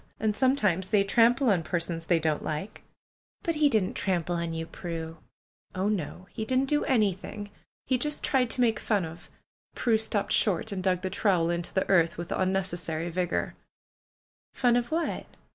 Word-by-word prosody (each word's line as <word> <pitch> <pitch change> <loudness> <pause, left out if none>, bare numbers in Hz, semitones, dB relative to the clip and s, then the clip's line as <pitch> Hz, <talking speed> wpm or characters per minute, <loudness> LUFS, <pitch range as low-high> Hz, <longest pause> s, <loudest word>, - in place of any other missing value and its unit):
And 215 -1 0
sometimes 210 -8 +2
they 205 -2 +4
trample 235 +4 +4
on 180 -4 +2
persons 165 0 -3
they 175 - +4
don't 155 -2 0
like." 155 +7 -4 0.6
"But 335 -4 0
he 300 -2 +3
didn't 215 -7 +1
trample 175 -3 -1
on 170 0 -2
3 165 0 -3
^ou, 165 - -12
Prue?" 165 -1 -6 0.6
"Oh, 190 +2 0
no! 180 -2 -3
lie 220 - -2
didn't 260 +3 +2
do 295 +2 +1
anything. 205 -3 -1 0.3
He 255 -2 +1
just 300 +3 -2
tried 255 -3 +2
to 250 - 0
make 225 -3 +2
fun 205 -5 0
of 160 +1 -11 0.2
" - - -46
Prue 225 -3 +2
stopped 215 -2 0
short, 210 +2 +2
and 195 -2 -3
dug 185 -1 +1
the 185 - -2
trowel 180 -4 +2
into 170 0 -3
the 190 - 0
earth 170 -4 +3
with 170 0 -6
unnecessary 175 -3 -1
vigor. 180 0 -1 1.0
"Fun 245 -2 +3
of 240 0 0
what?" 330 +1 -2
190 Hz, 180 wpm, -28 LUFS, 170-230 Hz, 1.0 s, they